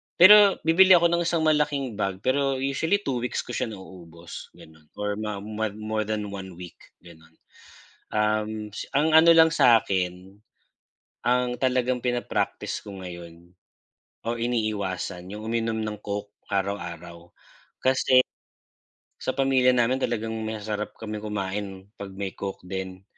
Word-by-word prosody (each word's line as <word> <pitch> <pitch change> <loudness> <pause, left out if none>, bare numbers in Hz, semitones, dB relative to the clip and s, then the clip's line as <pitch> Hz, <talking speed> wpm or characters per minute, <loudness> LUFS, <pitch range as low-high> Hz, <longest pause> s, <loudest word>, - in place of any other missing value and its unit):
Pero 200 +2 +8
bibili 185 +3 +7
ako 170 0 +4
ng 170 0 +1
isang 170 -2 +1
malaking 145 -7 +1
bag, 95 -1 -2
pero 135 +1 +1
usually 140 +9 0
2 130 -3 -1
weeks 125 - -3
ko - - -9
siya 120 - -2
nauubos 85 -4 -11
gano'n, 80 -1 -17
or 105 0 -3
mga 105 -2 -4
more 110 0 -3
more 110 0 -2
than 105 -2 -3
1 95 -3 -8
week 90 -1 -11 0.2
gano'n. 80 -1 -17 0.8
Um, 105 0 -1 0.2
ang 150 +3 +3
ano 165 +1 +8
lang 160 -1 +7
sakin. 95 - +2 0.9
Ang 125 0 +1
talagang 125 -1 0
pinapractice 120 -1 -2
ko 100 -2 -8
ngayon 85 -1 -10 0.8
o 120 - 0
iniiwasan 100 -6 -2
yung 105 +1 -7
uminom 115 -1 -1
ng 105 -1 -4
coke 105 0 -5 0.2
araw-araw 85 -3 -4 0.5
kasi, 130 0 +4 1.0
sa 130 - -1
pamilya 135 -2 +3
namin 125 +1 +2
talagang 115 -1 -2
masasarap 105 -1 -4
kami 110 -1 -5
kumain 100 -2 -4
pag 100 - -5
may 95 -1 -4
coke 100 -2 -6
din. 95 0 -6
110 Hz, 135 wpm, -25 LUFS, 95-130 Hz, 1.0 s, Pero